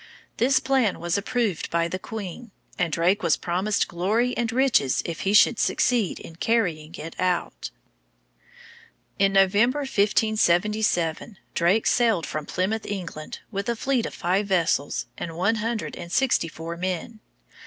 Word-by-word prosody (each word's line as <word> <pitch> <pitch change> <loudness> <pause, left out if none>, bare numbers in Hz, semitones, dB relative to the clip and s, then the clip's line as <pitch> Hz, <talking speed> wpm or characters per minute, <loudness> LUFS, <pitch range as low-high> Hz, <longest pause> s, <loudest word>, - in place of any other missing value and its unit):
This 260 +3 +3
plan 265 -7 +1
was 175 0 -1
approved 205 -3 -1
by 170 0 +1
the 185 +2 -4
queen, 220 +2 -7 0.3
and 175 -2 +1
Drake 180 +6 +2
was 170 -3 +2
promised 190 +4 0
glory 215 +8 0
and 240 0 -1
riches 245 - +2
if 165 -2 -4
he 195 - 0
should 210 +1 +5
succeed 235 -7 +1
in 165 - -11
carrying 175 -8 0
it 165 +1 -8
out. 180 -1 -1 1.5
In 195 0 +4
November, 205 +8 +3
1577, 210 - +1 0.2
Drake 180 +6 +2
sailed 225 -9 +2
from 155 -1 -5
Plymouth, 215 +5 -2
England, 175 -6 -6
with 200 +2 -3
a 235 - 0
fleet 255 0 0
of - - -9
five 190 +4 0
vessels 170 -6 0
and 165 -1 -5
one 205 +6 +1
hundred 225 +1 -3
and 170 - -9
sixty 265 -6 +2
four 165 +1 -7
men. 185 +5 -4
195 Hz, 145 wpm, -24 LUFS, 170-225 Hz, 1.5 s, should